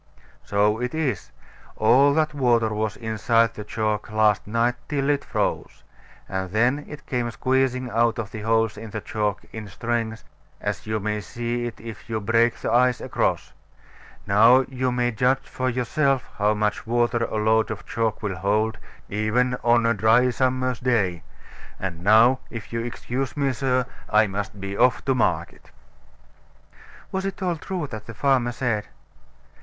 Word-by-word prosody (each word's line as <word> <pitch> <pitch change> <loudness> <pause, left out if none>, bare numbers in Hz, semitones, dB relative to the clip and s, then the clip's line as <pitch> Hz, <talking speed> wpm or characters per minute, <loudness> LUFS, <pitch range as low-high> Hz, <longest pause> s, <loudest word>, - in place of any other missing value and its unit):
So 105 +2 +1
it 125 +4 -2
is. 135 - -2 0.5
All 135 +6 +4
that 155 -1 +1
water 120 -5 +2
was 105 0 -2
inside 115 0 +1
the 105 - -7
chalk 110 0 -2
last 110 -2 +2
night, 115 +3 +1 0.2
till 145 -1 +1
it 140 -1 0
froze. - - -3 0.4
And 95 -1 -3
then 120 +9 +1
it 150 0 -10
came 125 -3 -1
squeezing 130 +1 0
out 115 +1 +2
of 110 -3 -4
the 110 - -6
holes 110 -1 +1
in 110 +1 -8
the 110 +1 -4
chalk 105 -1 -2
in 110 -2 -6
strings, 115 +2 -3 0.4
as - - -4
you 110 0 -1
may 105 +1 -2
see 120 +2 -3
it 120 - -8
if 115 0 -10
you 110 -1 -1
break 115 +2 +2
the - - -3
ice 125 +1 +3
across. - - -1 0.7
Now 115 +6 +6
you 130 -1 -2
may 125 0 +1
judge 125 +4 +1
for 130 0 -2
yourself 130 +1 0
how 105 +1 +3
much 105 +1 -1
water 120 0 +1
a - - -5
load 110 +1 +2
of 110 -2 -6
chalk 115 0 -2
will 100 -3 -2
hold, 105 +3 0 0.3
even 110 +5 +1
on 120 0 +4
a 115 - +3
dry 115 +4 +4
summer's 130 -1 0
day. 100 -9 +1 0.6
And 85 -3 -5
now, 115 +6 +6
if 115 -1 -8
you'll 115 0 -2
excuse 125 +3 -4
me, 140 -2 +1
sir, 125 0 0 0.2
I 105 0 +5
must 100 0 -5
be 100 0 -5
off 125 +4 +2
to 135 - +2
market. 125 - -1 1.4
Was 190 0 -2
it 195 0 -4
all 175 -2 0
true 180 0 -4
that 110 -2 -7
the 115 - -8
farmer 130 -1 +2
said? 120 -4 -2
115 Hz, 165 wpm, -24 LUFS, 110-125 Hz, 1.4 s, Now